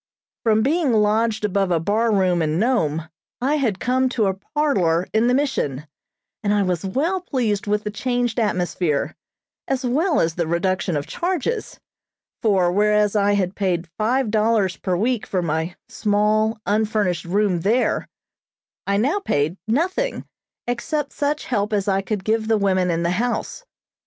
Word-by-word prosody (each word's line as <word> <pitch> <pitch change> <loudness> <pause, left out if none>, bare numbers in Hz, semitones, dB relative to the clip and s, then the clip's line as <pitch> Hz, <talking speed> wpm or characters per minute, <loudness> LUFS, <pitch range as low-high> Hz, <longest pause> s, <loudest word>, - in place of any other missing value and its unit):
From 220 -1 +3
being 300 -1 +2
lodged 215 +1 +2
above 195 -1 +1
a 170 -2 +2
bar 215 +7 +1
room 185 -4 +2
in 155 0 0
Nome, 165 - +1 0.3
I 280 +5 +1
had 225 -9 0
come 255 +1 +1
to 225 -4 0
a 190 - +1
parlor 190 - 0
in 220 +2 +3
the 250 - +3
Mission, 150 - -1 0.6
and 205 - 0
I 205 -1 +3
was 180 -2 -1
well 310 - 0
pleased 230 - -1
with 210 +1 0
the 210 - -3
changed 245 +1 -1
atmosphere, 180 -7 0 0.5
as 270 -1 -1
well 305 +7 +2
as 165 0 +1
the 170 -1 -2
reduction 175 0 0
of 145 - -3
charges; 370 - -2 0.6
for, 190 -6 +3
whereas 210 +1 +2
I 205 0 +3
had 190 -2 0
paid 180 -4 -2
five 235 +1 +1
dollars 215 -4 +2
per 180 -2 -2
week 235 +3 0
for 185 -2 -1
my 160 +2 -2
small, 215 +1 +1
unfurnished 205 -5 0
room 190 0 +1
there, 220 +9 +1 0.8
I 200 0 +2
now 275 - +1
paid 150 - 0
nothing, 370 - 0 0.4
except 280 +5 -2
such 295 +1 -1
help 210 -3 -1
as 205 -2 0
I 195 -1 +2
could 195 0 -3
give 220 +1 0
the 220 -1 +3
women 185 -3 +1
in 170 0 0
the 170 - +1
house. 245 - -2
210 Hz, 160 wpm, -22 LUFS, 185-245 Hz, 0.8 s, From